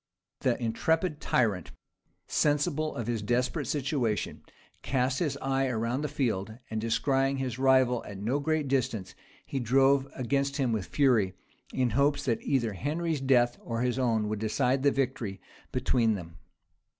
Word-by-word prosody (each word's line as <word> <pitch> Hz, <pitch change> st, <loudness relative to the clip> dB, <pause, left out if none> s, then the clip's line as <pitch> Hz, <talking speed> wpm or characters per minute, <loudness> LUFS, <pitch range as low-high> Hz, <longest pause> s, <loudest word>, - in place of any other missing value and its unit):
The 125 Hz, -2 st, +1 dB
intrepid 150 Hz, +8 st, 0 dB
tyrant, 105 Hz, -8 st, +1 dB, 0.6 s
sensible 150 Hz, +1 st, +1 dB
of 120 Hz, -, -3 dB
his 115 Hz, -2 st, -1 dB
desperate 125 Hz, +3 st, 0 dB
situation, 135 Hz, -7 st, -1 dB, 0.4 s
cast 130 Hz, 0 st, 0 dB
his 145 Hz, -5 st, -1 dB
eye 135 Hz, 0 st, 0 dB
around 120 Hz, +2 st, -1 dB
the 150 Hz, -, -1 dB
field, 110 Hz, -6 st, -2 dB
and 110 Hz, 0 st, -2 dB
descrying 135 Hz, +4 st, +1 dB
his 130 Hz, -2 st, -3 dB
rival 130 Hz, -2 st, +4 dB
at 100 Hz, -, -8 dB
no 115 Hz, +8 st, -1 dB
great 155 Hz, 0 st, 0 dB
distance, 115 Hz, -8 st, -1 dB, 0.3 s
he 135 Hz, -, -3 dB
drove 135 Hz, +3 st, +3 dB
against 140 Hz, +2 st, 0 dB
him 130 Hz, -4 st, +1 dB
with 105 Hz, -5 st, -2 dB
fury, 115 Hz, -10 st, +2 dB, 0.4 s
in 125 Hz, -2 st, 0 dB
hopes 140 Hz, +5 st, +2 dB
that 120 Hz, -4 st, 0 dB
either 120 Hz, -6 st, 0 dB
Henry's 155 Hz, -, -2 dB
death 120 Hz, -3 st, +3 dB
or 115 Hz, -1 st, -3 dB
his 125 Hz, +1 st, 0 dB
own 115 Hz, -4 st, +1 dB
would 105 Hz, 0 st, -2 dB
decide 125 Hz, +5 st, +1 dB
the 140 Hz, -, +5 dB
victory 125 Hz, -8 st, -2 dB, 0.3 s
between 115 Hz, -3 st, +2 dB
them. 85 Hz, -3 st, -9 dB
125 Hz, 150 wpm, -29 LUFS, 115-140 Hz, 0.6 s, the